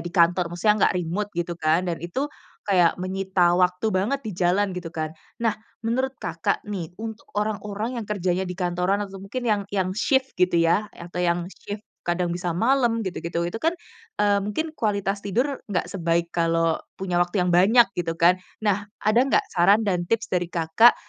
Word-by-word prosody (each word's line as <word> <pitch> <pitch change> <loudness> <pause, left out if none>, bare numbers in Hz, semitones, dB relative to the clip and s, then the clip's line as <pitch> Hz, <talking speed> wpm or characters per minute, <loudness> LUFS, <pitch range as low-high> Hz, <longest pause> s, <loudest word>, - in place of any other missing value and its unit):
di 175 - -5
kantor, 175 0 +3
maksudnya 210 +4 +3
nggak - - -2
remote 180 +4 -2
gitu 175 0 -1
kan, 160 +3 +2
dan 170 -2 -2
itu 175 - -2 0.4
kayak 180 -4 +3
menyita 185 -1 +1
waktu 180 +3 +2
banget 220 +9 +1
di 210 - -3
jalan, 185 +3 +2
gitu 180 -2 -5
kan. 155 -1 -3 0.3
Nah, 225 -2 +2 0.3
menurut 260 +3 0
Kakak - - -2
nih, 185 -6 -4
untuk 220 0 -7
orang-orang 210 +2 -2
yang 215 - -7
kerjanya 185 -2 0
di 180 - -4
kantoran 180 +2 +1
atau 195 -1 -10
mungkin 200 +6 -5
yang 210 -3 +2
yang 185 -2 0
shift 265 +3 +1
gitu 180 -1 +3
ya, 170 +6 +2
atau 175 +1 -7
yang 170 0 +1
shift 205 +1 -8 0.2
kadang 175 0 -1
bisa 175 0 -2
malam 230 +5 +2
gitu-gitu. 170 -2 -3
Itu 175 +6 -4
kan, 330 +2 +2 0.4
eee, 205 -1 +3
mungkin 310 +11 -3
kualitas 200 -2 0
tidur 250 +8 0
nggak 180 -3 0
sebaik 170 -2 0
kalau 165 -1 +2 0.2
punya 180 -2 -1
waktu 175 +3 -2
yang 180 - +1
banyak, 225 +7 +6
gitu 165 -1 -1
kan. 175 +2 +5 0.2
Nah, 205 -1 +1 0.2
ada 215 +3 +4
nggak - - +3
saran 195 +5 +5
dan 180 -3 +1
tips 230 0 +1
dari 180 -1 +1
Kakak 170 +8 +5
185 Hz, 180 wpm, -24 LUFS, 175-210 Hz, 0.4 s, banyak